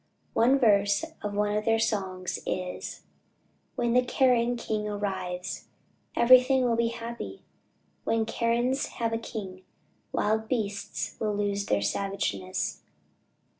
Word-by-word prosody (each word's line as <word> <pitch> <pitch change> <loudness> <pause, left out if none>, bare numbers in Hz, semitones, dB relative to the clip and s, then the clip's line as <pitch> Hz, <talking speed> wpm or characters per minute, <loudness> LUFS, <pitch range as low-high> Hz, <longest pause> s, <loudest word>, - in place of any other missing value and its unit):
One 255 +4 +5
verse 205 -1 +3 0.2
of 205 -1 -3
one 210 0 +1
of 210 - 0
their 225 0 +4
songs 190 -5 -1
is, 180 0 -4 0.7
"When 235 -1 +1
the 250 - +6
Karen 245 -1 +2
king 215 -2 -2
arrives 190 -3 -3 0.5
Everything 255 +2 +6
will 235 -1 +2
be 230 0 +2
happy; 235 0 -6 0.6
When 225 -1 +1
Karens 240 +4 +1
have 230 -1 0
a 225 - 0
king 190 -5 -6 0.5
Wild 220 +1 +1
beasts 210 -4 -2
will 210 -2 0
lose 200 0 -1
their 100 -1 +2
savageness." 190 - -2
220 Hz, 125 wpm, -28 LUFS, 200-235 Hz, 0.7 s, the